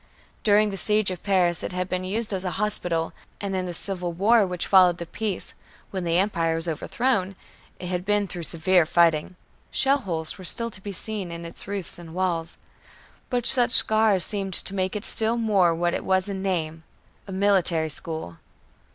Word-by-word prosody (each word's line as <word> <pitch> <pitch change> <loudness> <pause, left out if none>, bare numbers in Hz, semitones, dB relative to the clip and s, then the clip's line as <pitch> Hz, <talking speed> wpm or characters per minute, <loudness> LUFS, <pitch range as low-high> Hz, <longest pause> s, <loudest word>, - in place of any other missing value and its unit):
During 210 0 +3
the 195 - -6
siege 210 +1 +3
of 180 - -7
Paris 180 -4 +1
it - - -5
had 180 0 -3
been 185 0 -3
used 210 +3 -1
as 190 -1 -2
a 185 - -2
hospital; 175 -6 +2 0.3
and 200 -1 -4
in 185 -1 -2
the - - -4
civil 180 -1 -1
war 205 +4 +3
which 180 -1 -2
followed 180 -3 +5
the 170 - -6
peace, 200 +2 -4 0.4
when 185 -2 -4
the 170 0 +1
Empire 170 -4 0
was 165 +1 +1
overthrown, 195 - -1 0.4
it - - -9
had 180 0 -3
been 205 +1 0
through 180 -2 -7
severe 170 0 +2
fighting. 170 +1 +2 0.3
Shell 275 +1 +3
holes 165 - -4
were - - -10
still 230 +7 +1
to 190 - -10
be 205 - -6
seen 200 -2 -5
in 170 0 -8
its 170 - -5
roofs 200 -3 -5
and 165 -1 -11
walls. 175 -3 -2 0.7
But 245 -1 -2
such 250 -2 +4
scars 215 -5 +4
seemed 195 -3 -1
to - - 0
make 190 +1 -2
it 210 - -3
still 225 +1 +5
more 195 -7 +2
what 175 +1 -1
it - - -3
was 190 +1 +1
in 195 -1 -5
name, 165 -4 -3 0.5
a - - -8
military 185 -5 +1
school. 155 - -5
185 Hz, 195 wpm, -24 LUFS, 170-205 Hz, 0.7 s, followed